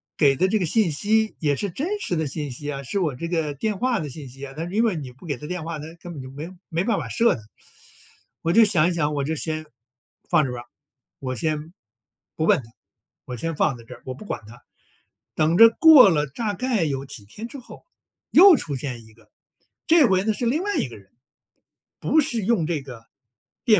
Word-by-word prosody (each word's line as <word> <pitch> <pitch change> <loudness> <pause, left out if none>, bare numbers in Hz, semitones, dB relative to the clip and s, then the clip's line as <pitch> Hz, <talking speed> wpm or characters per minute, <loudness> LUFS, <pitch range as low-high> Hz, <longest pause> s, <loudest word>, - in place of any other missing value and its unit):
给 140 -4 +3
的 185 - +3
这 215 +3 +1
个 180 - 0
信 205 +1 +2
息， 215 +8 +1
也 145 -3 +1
是 200 - -2
真 355 - -3
实 180 - -2
的 160 - -1
信 145 0 -4
息 145 +4 -5
啊 140 -1 -5
是 140 +9 -4
我 160 -8 0
这 170 - -4
个 160 -4 -1
电 205 +8 -2
话 250 0 0
的 155 - -4
信 140 -1 -9
息 135 +2 -9
啊。 135 - -10
但 165 +2 -4
是 - - -9
因 230 +2 +3
为 210 -6 +1
你 135 -5 -6
不 130 +8 -17
给 145 -5 -2
它 150 +4 -9
电 180 -2 -4
话， 165 -2 -4
它 150 - -7
根 175 0 -9
本 140 - -7
就 130 - -9
没 150 +5 -7 0.2
没 170 +2 -1
办 225 -4 +1
法 - - -4
设 235 0 +3
的。 110 - -10 1.0
我 165 +1 0
就 230 - +7
想 175 -6 +3
一 - - -1
想， 150 -3 0
我 140 - -1
就 160 +2 -1
先 155 0 -3 0.6
放 165 -4 +4
着 125 - -4
吧。 120 0 -6 0.6
我 130 -1 -4
先 155 +5 -3 0.6
不 160 - 0
问 - - +4
它， 115 - -17 0.5
我 125 - -6
先 165 +7 -3
放 150 -2 +1
在 115 - -13
这， - - -12
我 130 - -4
不 130 - -11
管 205 - -5
它。 120 +2 -15 0.7
等 160 +2 +2
着 230 +2 +10
过 295 -4 +8
了 150 -4 +1
大 205 - -3
概 225 -1 0
有 135 -2 -3
几 130 -7 -9
天 215 - -9
之 280 - -9
后， 245 - -14 0.5
又 370 +2 +9
出 150 - -3
现 125 -3 -6
一 110 - -18
个。 105 -1 -24 0.6
这 325 -3 +6
回 190 -2 +2
呢， 220 - +1
是 240 - -3
另 295 +10 +1
外 410 0 -1
一 - - 0
个 120 - -11
人， 100 -1 -20 2.5
不 240 - +1
是 210 - +7
160 Hz, 240 characters per minute, -23 LUFS, 140-210 Hz, 2.5 s, 着